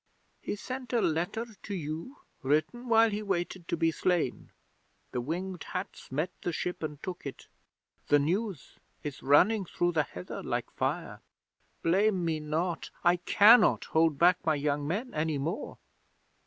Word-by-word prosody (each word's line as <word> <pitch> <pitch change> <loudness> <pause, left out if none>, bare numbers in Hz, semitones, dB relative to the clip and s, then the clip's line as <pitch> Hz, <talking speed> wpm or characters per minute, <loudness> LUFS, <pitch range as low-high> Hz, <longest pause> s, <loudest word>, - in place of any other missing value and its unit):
He - - -3
sent 255 +3 -6
a 240 - +4
letter 175 +7 0 0.2
to 205 - -5
you, 165 - -5 0.2
written 155 - 0
while 225 -1 +5
he 205 +1 -2
waited 185 -3 -2
to 170 - -1
be 165 0 +2
slain. 170 -5 0 0.6
The 125 - -2
Winged 175 +6 -4
Hats 185 -6 -5
met 155 +7 -1
the 175 - -1
ship 180 +2 -3
and 150 -2 -4
took 185 -2 -5
it. 140 - -7 0.6
The 145 - +6
news 175 - -2 0.2
is 145 -2 -6
running 190 +10 +4
through 175 0 0
the 160 -3 +2
heather 90 -11 -7
like - - -3
fire. - - -3 0.6
Blame 190 +1 +2
me 160 -2 0
not! 160 +3 -2
I 175 +1 +5
cannot 210 +6 +6
hold 160 -2 +3
back 180 +3 +4
my 160 -1 +2
young 145 0 -1
men 220 - -2
any 155 -1 0
more." 160 - -3
175 Hz, 155 wpm, -30 LUFS, 155-200 Hz, 0.6 s, The